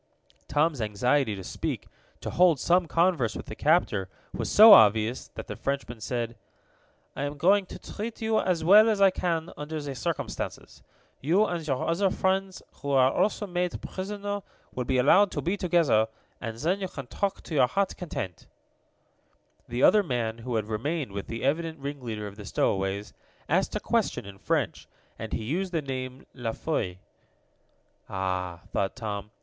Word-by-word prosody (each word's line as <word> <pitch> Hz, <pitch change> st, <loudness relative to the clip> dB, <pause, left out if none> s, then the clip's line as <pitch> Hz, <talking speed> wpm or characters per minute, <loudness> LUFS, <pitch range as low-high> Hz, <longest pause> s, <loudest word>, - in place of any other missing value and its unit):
Tom's 150 Hz, -2 st, +1 dB
anxiety 110 Hz, +3 st, +1 dB
to 95 Hz, -, -8 dB
speak, -, -, -4 dB, 0.3 s
to -, -, -4 dB
hold 175 Hz, -5 st, +4 dB
some 175 Hz, +3 st, +3 dB
converse 165 Hz, -8 st, +2 dB
with -, -, -6 dB
the 110 Hz, -, -8 dB
captor, 120 Hz, -, +2 dB, 0.2 s
was -, -, -3 dB
so 215 Hz, +1 st, +10 dB
obvious 110 Hz, -, +5 dB
that -, -, -6 dB
the -, -, -6 dB
Frenchman 135 Hz, -4 st, -3 dB
said: 115 Hz, +1 st, -3 dB, 0.8 s
"I -, -, -4 dB
am 145 Hz, +1 st, -3 dB
going 190 Hz, +5 st, +3 dB
to -, -, -8 dB
treat 220 Hz, +2 st, -6 dB
you 220 Hz, -1 st, +1 dB
as 175 Hz, -4 st, 0 dB
well 210 Hz, +6 st, +7 dB
as 215 Hz, -2 st, +1 dB
I 195 Hz, -1 st, +6 dB
can 170 Hz, -2 st, -2 dB
under 155 Hz, +1 st, -5 dB
the 145 Hz, -2 st, -5 dB
circumstances. 125 Hz, -, -4 dB, 0.4 s
You 180 Hz, +10 st, +3 dB
and 170 Hz, -5 st, -3 dB
your 135 Hz, -3 st, -1 dB
other 190 Hz, +4 st, +2 dB
friends, 190 Hz, 0 st, -1 dB, 0.2 s
who 140 Hz, -, -4 dB
are 135 Hz, -1 st, +4 dB
also 210 Hz, 0 st, +1 dB
made 180 Hz, -2 st, -2 dB
prisoners, 205 Hz, +1 st, -4 dB, 0.3 s
will 125 Hz, -, -3 dB
be 130 Hz, 0 st, +1 dB
allowed 185 Hz, +11 st, +5 dB
to -, -, -2 dB
be 180 Hz, +4 st, 0 dB
together, 165 Hz, -, +3 dB, 0.3 s
and 115 Hz, -2 st, -5 dB
then 175 Hz, +10 st, 0 dB
you 190 Hz, -, -1 dB
can 140 Hz, -6 st, -8 dB
talk 195 Hz, +10 st, -3 dB
to -, -, -8 dB
your 130 Hz, -4 st, +4 dB
hearts' 195 Hz, +9 st, 0 dB
content." 100 Hz, -, -6 dB, 1.2 s
The 120 Hz, +2 st, -2 dB
other 210 Hz, -, +7 dB
man, 120 Hz, -, -2 dB
who 120 Hz, +1 st, -4 dB
had 110 Hz, -2 st, 0 dB
remained 125 Hz, +5 st, -2 dB
with 100 Hz, 0 st, -5 dB
the 115 Hz, -, -5 dB
evident 160 Hz, +4 st, 0 dB
ringleader 130 Hz, -7 st, -5 dB
of 100 Hz, 0 st, -9 dB
the 105 Hz, -, -9 dB
stowaways, 95 Hz, +2 st, -1 dB, 0.3 s
asked -, -, +1 dB
a -, -, 0 dB
question, -, -, 0 dB
in 100 Hz, -1 st, -11 dB
French, -, -, -1 dB, 0.3 s
and 110 Hz, -, -6 dB
he 110 Hz, -, -2 dB
used 180 Hz, -, -2 dB
the 165 Hz, -3 st, -1 dB
name 130 Hz, -1 st, -5 dB
La 120 Hz, -3 st, -3 dB
Foy. 100 Hz, -, -2 dB, 1.1 s
"Ah!" 90 Hz, -2 st, -3 dB
thought 95 Hz, -, -1 dB
Tom. 105 Hz, -4 st, -5 dB
140 Hz, 175 wpm, -27 LUFS, 110-180 Hz, 1.2 s, so